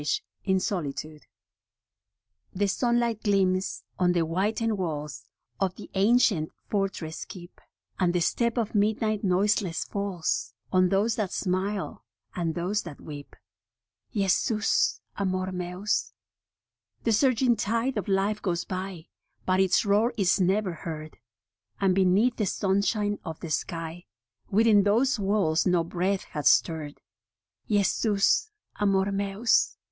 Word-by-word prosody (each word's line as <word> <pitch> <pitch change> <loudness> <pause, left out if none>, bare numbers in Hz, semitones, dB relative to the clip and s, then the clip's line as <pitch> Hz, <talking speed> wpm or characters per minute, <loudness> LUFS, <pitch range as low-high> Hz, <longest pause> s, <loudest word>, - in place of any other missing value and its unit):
* - - -6
HE 190 +6 -1
sunlight 175 -7 -2 2.2
gleams 190 -2 +1 0.2
on 180 -1 +3
the 175 - +2
whitened 210 +6 0
walls 150 -8 -4 0.3
Of 190 -2 0
the - - -11
ancient 200 -5 +3 0.2
fortress 195 -6 -2
keep, 175 -1 -12 0.4
And 180 -2 +3
the 175 - +1
step 235 +8 0
of 225 -3 -1
midnight 215 0 +1
noiseless 190 -1 +1
falls 180 - -2 0.2
On 185 -1 +4
those 205 +4 +1
that 205 -4 -1
smile 190 +1 -2 0.3
and 165 -3 -1
those 190 +5 -1
that 165 -5 -10
weep. 145 -2 -9 0.8
Jesus 210 +2 +1 0.2
Amor 185 -1 -1
Meus. 180 +3 -2 0.9
The 230 - +2
surging 250 +1 +3
tide 230 +5 -1
of - - -3
life 200 +2 +1
goes 175 -3 -1
by, 185 -3 -5 0.4
But 185 0 +2
its 190 +2 +3
roar 210 +4 +2
is 195 -1 +2
never 190 +1 +1
heard; 155 -3 -7 0.6
And 195 -2 +3
beneath 195 +6 +3
the 210 - 0
sunshine 200 +2 0
of 160 -2 -6
the 165 - -6
sky 165 +1 -4 0.4
Within 215 0 +5
those 230 +5 +2
walls 195 -6 +1
no 180 -2 +3
breath 185 +3 -1
hath 150 -1 -2
stirred. 155 -3 +2 0.7
Jesus 205 - +2 0.3
Amor 195 -1 +2
Meus. 200 +3 +1
195 Hz, 120 wpm, -27 LUFS, 175-210 Hz, 2.2 s, Within